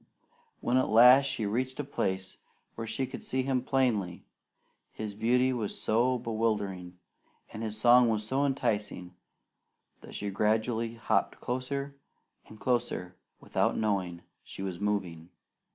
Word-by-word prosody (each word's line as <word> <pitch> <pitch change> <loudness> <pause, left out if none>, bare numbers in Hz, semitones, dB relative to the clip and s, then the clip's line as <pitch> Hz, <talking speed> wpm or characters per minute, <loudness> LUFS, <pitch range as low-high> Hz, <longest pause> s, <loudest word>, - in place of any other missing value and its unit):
When 125 +2 +2
at 130 - +2
last 125 +5 +8
she 115 -5 -2
reached 130 +6 -2
a - - 0
place 95 -8 -3 0.4
where 115 0 -6
she 130 - -1
could - - -8
see 130 0 -1
him 130 -1 0
plainly, 120 -9 0 0.7
his 105 -2 -6
beauty 125 +5 +2
was 110 -5 -3
so 125 +3 +2
bewildering, 105 -6 -2 0.6
and 110 - -6
his 110 -1 -3
song 120 -1 +6
so 130 +7 -1
enticing 105 -9 -1 0.9
that - - -12
she 100 -1 -3
gradually 110 +3 0
hopped 115 - 0
closer 140 +3 -3 0.5
and 110 - -13
closer 100 -7 -1 0.2
without - - 0
knowing 95 -5 -1 0.2
she 95 - -8
was 90 -3 -4
moving. 95 -5 -2
110 Hz, 135 wpm, -29 LUFS, 100-125 Hz, 0.9 s, last